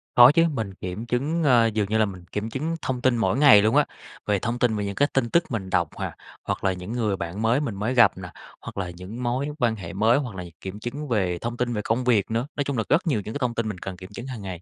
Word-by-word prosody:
Có 120 +2 +9
chứ, 165 +2 +4
mình 110 -8 -3
kiểm 95 +5 -6
chứng, 145 +8 -1
ờ, 120 -5 +5
dường 105 -2 -1
như 110 - +1
là 110 - +4
mình 95 -3 -8
kiểm 105 +2 -3
chứng 155 +7 -2
thông 125 -2 -2
tin 125 -2 +3
mỗi 115 +2 +1
ngày 135 -8 +8
luôn 110 +1 +2
á, - - +5 0.4
về 105 -1 +1
thông 120 +5 -2
tin 115 -3 +2
về 105 - -2
những 100 0 -4
cái 145 - +3
tin 125 -3 +1
tức 170 +5 +3
mình 95 -5 -3
đọc 85 -4 +1
à, - - -5 0.3
hoặc - - -3
là 95 -1 +2
những 90 +4 -7
người 110 -5 0
bạn 85 +5 -5
mới 115 +5 +3
mình 115 -9 -3
mới 105 +6 -1
gặp 120 -6 +5
nè, 90 -2 -7 0.3
hoặc - - -9
là 95 -2 -2
những 90 +8 -8
mối 125 +4 -1
quan 120 -4 +2
hệ 95 -6 -8
mới, 110 +6 +3
hoặc 125 -9 -4
là 90 - -5
những 85 -2 -12
kiểm 95 +2 -6
chứng 140 +7 -5
về 95 -8 0
thông 120 +4 -4
tin 120 0 -1
về 105 - -1
công 115 +4 0
việc 110 -4 +2
nữa, 115 +5 -1
nói 145 - 0
chung 140 -3 -3
là 110 - +1
rất 170 +5 +2
nhiều 125 -10 +1
những 110 - -5
cái - - -4
thông 125 -3 -1
tin 115 -2 -1
mình 95 - -5
cần 95 0 -7
kiểm 95 +1 -10
chứng 120 +5 -8
hàng 125 -5 -6
ngày. 95 -3 -6
115 Hz, 300 wpm, -25 LUFS, 100-125 Hz, 0.4 s, Có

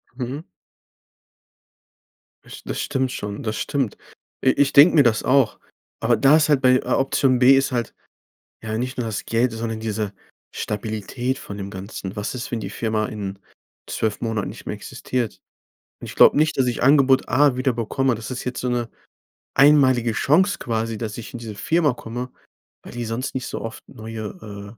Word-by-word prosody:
Mhm. 130 +5 -5 2.0
Das - - -13
st - - -13
das - - -3
stimmt 130 -3 -1
schon. 105 +4 -5
Das 110 -2 -2
stimmt. 135 -7 -2 0.5
I - - +6
ich 140 +1 +2
denke 150 +5 +8
mir 145 - +7
das 115 -4 +2
auch. 130 -4 +2 0.4
Aber 115 +1 +3
da 135 +7 +6
ist 155 -1 +2
halt 145 -3 +3
bei, 130 -1 +5
äh, - - +3
Option 135 -1 +2
B 130 +2 +7
ist 135 0 +1
halt, 120 -3 -2 0.7
ja, 110 0 -3
nicht 125 +2 -3
nur 120 - -1
das 110 -3 -4
Geld, 115 +1 +1
sondern 115 0 -4
diese 110 -2 -3 0.4
Stabilität 110 +5 -3
von 100 - -8
dem 100 0 -5
Ganzen. 95 0 -7
Was 105 +4 -3
ist, 125 - -5
wenn 120 - -2
die - - -5
Firma 110 -2 -1
in 100 -2 -6 0.5
12 110 -2 -2
Monaten 110 -3 -2
nicht - - -10
mehr - - -3
existiert? 120 -7 -4 0.6
Und - - -8
ich - - -9
glaube - - +7
nicht, 155 +1 +2
dass 130 -2 +2
ich 120 - -1
Angebot 135 -1 +5
A 140 0 +4
wieder 130 0 +1
bekomme. 120 +3 0
Das 110 +2 -7
ist 130 - -4
jetzt 125 -1 -3
so 125 - -1
'ne, 120 -1 -1 0.7
einmalige 130 -5 +5
Chance 175 - +3
quasi, 115 -1 -2
dass 110 -1 -5
ich 115 - -8
in 120 - -6
diese 110 -3 -7
Firma 150 - +1
komme, 120 +2 -6 0.5
weil - - -11
die 120 0 -4
sonst 115 +5 -4
nicht 130 - -3
so - - -5
oft 115 - -8
neue, 110 - -8
120 Hz, 185 wpm, -22 LUFS, 110-135 Hz, 2.0 s, denke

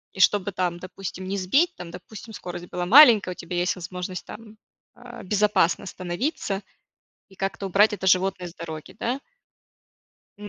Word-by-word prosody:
И 190 - -8
чтобы 205 +1 +3
там, 180 -1 -1
допустим, 185 0 -7
не 195 +1 -2
сбить, 280 - +2
там, 170 -1 -8
допустим, 205 +5 -11
скорость 175 0 -7
была 175 0 -3
маленькая, 225 -6 +8
у - - -7
тебя 175 +1 -6
есть 180 +1 +1
возможность 180 0 -6
там, 220 0 -11 0.4
а, 245 -3 -11
безопасно 205 -3 +2
остановиться 195 - -3 0.7
и 190 - -19
как-то 195 0 -3
убрать 205 +3 +4
это 190 -2 -4
животное 185 -1 +2
с 170 - -14
дороги, 160 +2 -8
да. 250 +4 -2 1.2
М, 205 0 -8
190 Hz, 160 wpm, -24 LUFS, 180-210 Hz, 1.2 s, маленькая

